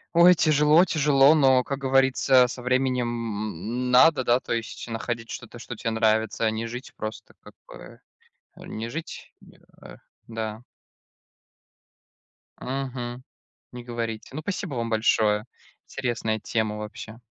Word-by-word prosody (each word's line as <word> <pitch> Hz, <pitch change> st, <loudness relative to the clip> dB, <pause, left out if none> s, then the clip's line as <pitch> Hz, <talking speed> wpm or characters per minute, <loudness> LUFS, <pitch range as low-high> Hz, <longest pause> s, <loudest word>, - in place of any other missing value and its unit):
Ой, 175 Hz, +1 st, +7 dB
тяжело 155 Hz, +3 st, +4 dB
тяжело, 145 Hz, -3 st, +4 dB
но, 130 Hz, -4 st, +4 dB
как 140 Hz, +2 st, -4 dB
говорится, 135 Hz, -1 st, +4 dB
со 125 Hz, -, -7 dB
временем, 125 Hz, -1 st, 0 dB
м, 115 Hz, +1 st, -4 dB
надо, 130 Hz, +2 st, +5 dB
да, 120 Hz, +1 st, +3 dB
то -, -, -4 dB
есть 115 Hz, +1 st, -5 dB
находить 115 Hz, 0 st, -4 dB
что-то, 120 Hz, 0 st, -8 dB
что 120 Hz, +1 st, -8 dB
те 115 Hz, -, -3 dB
нравится, 110 Hz, 0 st, +1 dB
а 110 Hz, -, +2 dB
не 110 Hz, +1 st, -4 dB
жить 125 Hz, +3 st, -8 dB
просто, 110 Hz, 0 st, -7 dB
как -, -, -16 dB
бы. -, -, -13 dB, 0.6 s
Не 110 Hz, +1 st, -7 dB
жить, 160 Hz, +6 st, -8 dB
м, -, -, -18 dB, 0.3 s
э, -, -, -12 dB, 0.3 s
да. 110 Hz, 0 st, -5 dB, 2.0 s
Мгм. 125 Hz, -2 st, -5 dB, 0.5 s
Не 125 Hz, -1 st, -9 dB
говорите. 115 Hz, -2 st, -5 dB
Ну, 155 Hz, -, -4 dB
спасибо 185 Hz, -5 st, -4 dB
вам 115 Hz, -1 st, -2 dB
большое. 110 Hz, -1 st, +2 dB, 0.4 s
Интересная 115 Hz, -4 st, -2 dB
тема 110 Hz, -1 st, -2 dB
вообще. 105 Hz, +1 st, -8 dB
120 Hz, 135 wpm, -25 LUFS, 110-135 Hz, 2.0 s, Ой